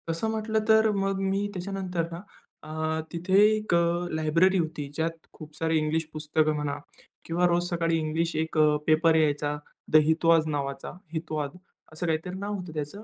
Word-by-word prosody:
तसं 165 +7 -1
म्हटलं 220 0 0
तर 220 0 +6
मग 195 -1 -1
मी 195 +1 0
त्याच्यानंतर 180 -2 -3
ना 170 +1 -6 0.4
अ, 155 +1 -2
तिथे 180 +3 +1 0.2
एक 215 -3 -2
अ, 170 +1 +1
लायब्ररी 165 +5 +3
होती. 160 -4 -2
ज्यात 160 +2 0 0.2
खूप 155 -1 -12
सारे 160 0 +1
इंग्लिश 155 +1 0
पुस्तकं 155 0 +1
म्हणा 150 -1 -2 0.5
किंवा 175 +2 +1
रोज 175 0 +2
सकाळी 165 -1 +1
इंग्लिश 160 +2 -1
एक 160 +1 -2 0.3
पेपर 160 +1 +4
यायचा, 150 -1 +1 0.3
द - - +1
हितवाद 165 0 +3
नावाचा, 140 -2 -3 0.2
हितवाद. 155 -2 -3 0.4
असं 160 +3 -4
काहीतरी 165 +3 -2
नाव 205 +1 -3
होतं 180 -4 -7
त्याचं, 155 +7 -5
165 Hz, 160 wpm, -27 LUFS, 155-180 Hz, 0.5 s, तर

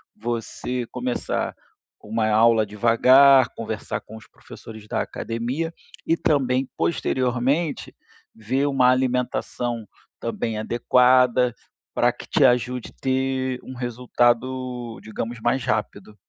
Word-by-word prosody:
você 120 +2 -4
começar 125 0 -3 0.5
uma 110 +1 -1
aula 110 0 +4
devagar, 125 +5 +5
conversar 110 -2 -4
com 110 - -13
os 110 - -15
professores 110 -1 -13
da - - -1
academia, 125 +9 -3 0.4
e 165 - +2
também 135 -5 +1
posteriormente 130 +1 -1 0.4
ver 130 +6 -1
uma 130 -3 +3
alimentação 125 -3 -1 0.3
também 110 -2 -3
adequada 125 +2 +3 0.4
para - - +3
que - - -11
te - - +2
ajude 125 0 +1
ter 130 -1 -1
um 130 - -9
resultado, 120 0 -1
digamos, 115 +2 -5
mais 120 +3 0
rápido. 105 -1 -3
125 Hz, 105 wpm, -23 LUFS, 115-130 Hz, 0.5 s, devagar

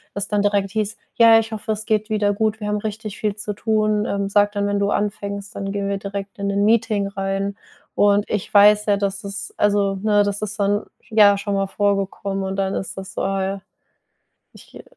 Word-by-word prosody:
das 200 - -3
dann 210 -1 +1
direkt 200 -1 +1
hieß: 215 0 -2 0.2
„Ja, 230 -1 +7
ich 225 0 -4
hoffe, 215 0 -4
es 215 +1 -7
geht 215 0 0
wieder 205 -1 +1
gut, 220 +1 -1
wir 210 - -4
haben 210 0 0
richtig 215 0 -6
viel 210 -2 -1
zu 210 0 -4
tun. 215 0 +1
Ähm, 200 -3 -2
sag 205 0 +3
dann, 200 0 -1
wenn 205 0 0
du 200 0 +1
anfängst, 200 -1 -3
dann 195 0 -4
gehen 200 -1 -2
wir 200 - -1
direkt 200 0 -6
in 200 - -2
'nen 200 +1 +1
Meeting 215 -2 +2
rein." 195 0 -3 0.4
Und 205 0 +3
ich 210 -1 -3
weiß 210 +1 +6
ja, 205 - +3
dass 200 0 -2
es 200 +1 -6
also, 200 -1 +2
ne 210 -1 +3
das 205 0 -2
ist 210 0 -5
dann, 205 +1 +1 0.2
ja, 205 -2 +6
schon 200 0 -3
mal 195 0 0
vorgekommen 195 -1 -1
und 190 0 -3
dann 195 0 -1
ist 190 - -5
das 190 0 -8
so, - - -3
ah 195 0 0
ja, 195 0 -3 0.9
ich - - -16
g - - -12
205 Hz, 220 wpm, -21 LUFS, 200-210 Hz, 0.9 s, Ja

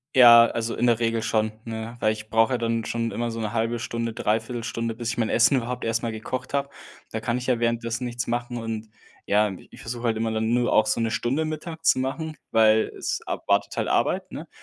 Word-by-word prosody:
Ja, 120 -2 +9
also 115 0 -3
in 125 - +1
der 120 -1 +3
Regel 115 -1 0
schon, 110 -1 0
ne, 115 +1 -6
weil 110 -1 +2
ich 110 0 -10
brauch 115 +1 +4
ja 125 - +1
dann 115 -1 -1
schon 115 -1 -2
immer 120 0 -2
so 115 0 -5
'ne 110 -2 -2
1/2 115 +1 0
Stunde, 115 0 -3
3/4 115 +2 -1
Stunde, 115 0 -3
bis 120 0 -4
ich 120 - -3
mein 115 -2 0
Essen 125 +4 +4
überhaupt 125 0 -3
erst 115 0 0
mal 115 - -2
gekocht 125 +5 -5
habe. 140 0 0 0.4
Da 110 - -2
kann 120 +2 -1
ich 125 - -5
ja 125 -3 +2
währenddessen 115 +1 -1
nichts 120 0 -3
machen 120 +1 -3
und 115 -1 -4 0.4
ja, 105 +1 +3
i 95 - -10
ich - - -14
versuche 120 +1 -6
halt 115 -2 +1
immer 110 0 -1
dann 110 +1 0
nur 120 0 +2
auch 110 - +5
so - - +1
'ne 115 -1 0
Stunde 120 +7 0
Mittag 160 +1 -6
zu - - +5
machen, 155 +4 -3
weil 110 -1 +4
es - - -2
ab - - -4
wartet - - +1
halt - - -1
Arbeit, - - 0
ne? - - -7
115 Hz, 240 wpm, -25 LUFS, 110-120 Hz, 0.4 s, Ja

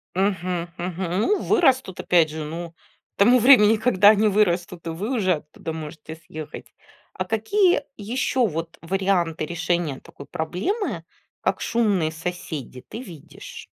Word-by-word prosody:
Мгм, 185 -3 -1
мгм. 180 +1 -3
Ну, 395 - +1
вырастут, 265 - +2
опять 165 -3 +3
же, 155 0 -5
ну, 165 +2 -6
к 170 - -35
тому 240 +5 +6
времени, 225 -3 +7
когда 210 -3 +5
они 215 0 +4
вырастут 180 -4 0
и - - -1
вы 200 +10 -3
уже 185 -4 +2
оттуда 155 +2 -8
можете 160 0 -8
съехать. 155 -1 -10 0.4
А 185 - -3
какие 320 - +2 0.2
еще 240 +3 0
вот 165 0 -5
варианты 175 -3 0
решения 165 -3 -1
такой 140 - -13
проблемы, 185 - -3 0.4
как - - 0
шумные 200 -9 +1
соседи, 160 -6 -6
ты 230 - -7
видишь? 160 - -11
180 Hz, 140 wpm, -23 LUFS, 165-215 Hz, 0.4 s, времени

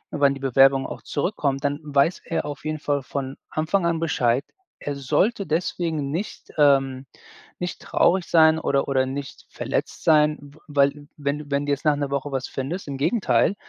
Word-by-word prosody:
wann 140 -2 +4
die - - -9
Bewerbung 135 0 +4
auch - - -8
zurückkommt.“ 145 -4 -1
Dann 145 +1 0
weiß 145 +4 +1
er 165 -3 -2
auf 145 0 -7
jeden 155 0 -2
Fall 145 -1 0
von 135 0 -4
Anfang 170 +4 0
an 165 -1 0
Bescheid. 130 -5 +1 0.4
Er 145 - -4
sollte 195 - +1
deswegen 160 -3 -1
nicht, 185 +7 -5
ähm 135 -2 +3 0.5
nicht 180 -1 -4
traurig 180 +1 +2
sein 160 -1 +5
oder 140 -3 0
oder 130 -1 +2
nicht 140 +1 -6
verletzt - - -3
sein, 150 -1 +4
w 145 +1 -15
weil 145 0 +1
wenn 145 0 -2
du 150 - -8
wenn 140 +1 +1
du 145 - -1
jetzt 140 +2 -2
nach 150 - +4
'ner 145 -1 -3
Woche 140 +1 -2
was 135 -1 -2
findest 150 +7 -5
Im 140 -1 -4
Gegenteil, 200 - +2
145 Hz, 185 wpm, -24 LUFS, 140-160 Hz, 0.5 s, sein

